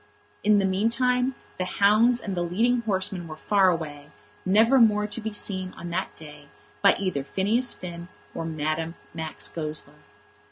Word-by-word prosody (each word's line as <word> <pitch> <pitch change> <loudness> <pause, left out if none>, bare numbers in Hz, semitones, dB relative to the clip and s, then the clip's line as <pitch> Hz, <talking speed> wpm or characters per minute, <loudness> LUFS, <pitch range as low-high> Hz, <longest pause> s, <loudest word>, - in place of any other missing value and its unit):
In 210 0 +5
the 195 - +2
meantime 250 +6 +1 0.2
the - - +1
hounds 220 +5 +4
and 195 -3 -4
the 175 - -1
leading 230 +8 +1
horsemen 190 -4 -1
were 155 -1 -8
far 195 +2 +3
away, 150 -4 -4 0.4
never 225 +7 +5
more 210 -3 +4
to 210 +2 -5
be 220 0 -3
seen 185 -3 -3
on 170 - -7
that 185 +3 -3
day 150 -2 -11 0.3
by - - +6
either 185 -8 -2
Phineas 220 - +1
Finn 170 -1 -8 0.3
or - - -4
Madame 160 +1 -2 0.2
Max 160 -1 -2
Goesler. 150 -2 -4
190 Hz, 160 wpm, -25 LUFS, 165-215 Hz, 0.4 s, by